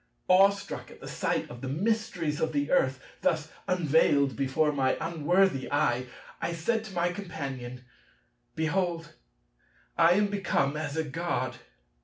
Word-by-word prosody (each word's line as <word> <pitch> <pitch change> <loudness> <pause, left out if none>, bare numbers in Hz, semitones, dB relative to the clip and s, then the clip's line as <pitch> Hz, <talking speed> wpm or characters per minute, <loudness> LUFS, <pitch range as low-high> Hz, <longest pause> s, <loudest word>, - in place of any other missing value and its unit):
Awestruck 195 +2 +3
at - - -14
the - - -9
sight - - -1
of 120 0 -9
the 135 - -4
mysteries 180 -2 -1
of 160 0 0
the 145 0 0
earth, 130 -7 +3 0.2
thus 160 -1 0 0.2
unveiled 145 -6 +3
before 140 +5 +1
my 135 -2 +1
unworthy 170 -1 +1
eye, 125 -3 +1 0.3
I - - -1
said 220 +7 0
to 195 -4 -9
my 175 0 +1
Companion, 135 -10 -6 0.7
"Behold, 165 +1 -1 0.9
I 165 +1 +7
am 205 +3 +3
become 170 -8 0
as 155 0 -3
a 160 - +1
God. 165 +4 -2
160 Hz, 140 wpm, -28 LUFS, 140-180 Hz, 0.9 s, I